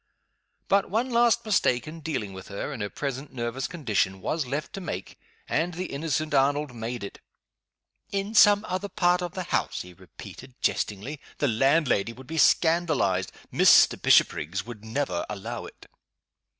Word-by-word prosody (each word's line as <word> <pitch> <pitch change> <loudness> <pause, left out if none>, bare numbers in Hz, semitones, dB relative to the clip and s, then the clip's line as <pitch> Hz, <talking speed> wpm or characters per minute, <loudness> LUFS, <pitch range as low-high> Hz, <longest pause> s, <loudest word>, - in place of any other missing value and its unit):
But 200 0 +2
one 235 +6 0
last 235 0 +3
mistake 125 - +1
in 160 +1 -8
dealing 125 -11 -3
with 95 0 -10
her, 100 +8 -5
in 120 - -6
her 105 - -2
present 140 +2 -5
nervous 120 +1 -3
condition, 100 - -1
was 150 - -2
left 145 +4 -4
to 195 - -6
make 95 - -6 0.3
and 165 +3 -1
the 180 +2 -3
innocent 155 +1 -2
Arnold 140 0 +2
made 115 0 -5
it. 100 - -8 0.9
"In 200 +2 -2
some 205 -1 +6
other 185 +2 -3
part 180 -3 +2
of 175 0 -5
the 185 - -3
house?" - - -1
he 90 0 -13
repeated, 95 - -13
jestingly. 115 +9 -2 0.2
"The 145 - +1
landlady 125 -2 +2
would 130 +3 -13
be 160 +4 -4
scandalized. 155 - +3 0.2
Mr. - - +6
Bishopriggs 85 +7 +3
would 115 -3 -10
never 110 -6 -2
allow 100 -2 -5
it!" - - -15
140 Hz, 160 wpm, -26 LUFS, 110-175 Hz, 0.9 s, some